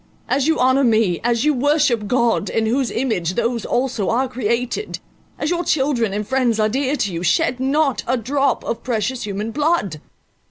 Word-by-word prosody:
As 270 +2 +1
you 320 - +2
honour 260 +2 +3
me—as 225 - +1
you 300 - +4
worship 275 -5 +1
God, 235 0 +1
in 225 - 0
whose 250 +3 0
image 200 -9 -1
those 235 -1 -1
also 245 -6 -1
are 255 +4 +1
created—as 250 - -4
your 350 0 0
children 265 - +1
and 205 +1 -3
friends 250 -4 +1
are 215 0 +2
dear 270 +4 0
to 205 -9 -2
you,—shed 180 - +1
not 275 +1 +1
a 255 +2 +1
drop 270 +3 0
of 235 - -3
precious 240 0 -2
human 205 +3 -3
blood." 290 - 0
245 Hz, 165 wpm, -20 LUFS, 220-275 Hz, -, you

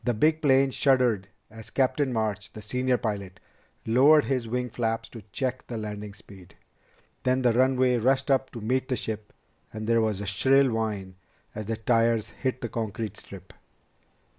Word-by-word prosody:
The 120 -2 0
big 155 +7 +2
plane 135 -2 +4
shuddered 125 -8 +2 0.2
as 110 0 -10
Captain 135 +1 +1
March, 110 -4 -2
the 110 - -9
senior 125 +3 0
pilot, 100 -5 -4 0.5
lowered 140 +7 +5
his 130 -4 -1
wing 125 +1 -2
flaps 115 0 -2
to 115 - -10
check 130 -1 -3
the 120 - -5
landing 105 -1 -6
speed. 100 -3 -15 0.7
Then 130 0 +1
the 120 -2 +4
runway 130 0 +3
rushed 130 +4 +1
up 135 -1 +2
to 115 - -7
meet 130 +4 0
the 130 - 0
ship, 110 -2 -5 0.4
and 110 0 -6
there 115 0 +3
was 110 -3 0
a 105 - -5
shrill 130 +7 +3
whine 105 -5 -3 0.4
as 105 -1 -6
the 115 -1 -2
tires 115 -1 +1
hit 130 -1 -3
the 120 - -3
concrete 110 -2 -4
strip. 95 -2 -12
115 Hz, 170 wpm, -26 LUFS, 110-130 Hz, 0.7 s, lowered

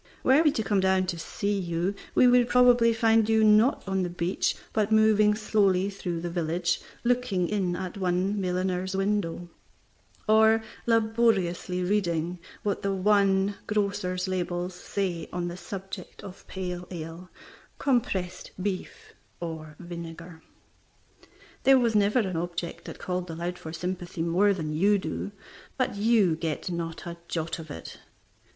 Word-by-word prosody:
Were 265 +4 +5
we 310 -2 +4
to 220 - -1
come 205 -1 +1
down 190 0 +3
to 175 -2 -3
see 200 +4 -2
you, 175 +1 -1 0.2
we - - +6
would 245 -1 +5
probably 245 -2 +5
find 225 -1 +3
you, 220 0 +4
not 215 +3 +4
on 190 0 0
the 180 - -1
beach, 175 +1 -1 0.2
but 215 -1 +1
moving 215 -1 +5
slowly 200 -3 +2
through 175 -4 -4
the 175 - -3
village, 170 0 -1 0.2
looking 240 -7 +1
in 190 -3 0
at 185 0 -4
the - - -9
one 190 +2 0
milliner's 185 +1 -1
window, 195 -3 -1 0.8
or 220 +1 +5 0.2
laboriously 220 -6 +1
reading 180 -3 0 0.2
what 205 -2 -1
the 200 - 0
one 195 0 +3
grocer's 200 -3 -1
labels 180 -1 -2
say 180 -2 -3
on 175 -1 -2
the 175 - -6
subject 195 +2 -8
of 190 -2 -11
pale 180 -2 -5
ale, 170 +1 -7 0.5
compressed 200 -9 -1
beef, 190 -1 -5 0.3
or 160 -3 -6
vinegar. 170 -1 -9 1.2
There 270 0 +6
was 235 -3 +2
never 210 +2 +3
an 190 -4 -3
object 170 0 -4
that - - -8
called 180 -1 -3
aloud 175 +2 -4
for 160 - -7
sympathy 175 0 -4
more 180 +5 +3
than 160 -6 -2
you 200 +6 +3
do, 200 - -4 0.5
but 255 -5 0
you 205 -5 +3
get 160 +2 -3
not 165 -1 -4
a 170 0 -6
jot 165 0 -3
of 160 -1 -9
it. 80 - -9
185 Hz, 150 wpm, -27 LUFS, 175-210 Hz, 1.2 s, we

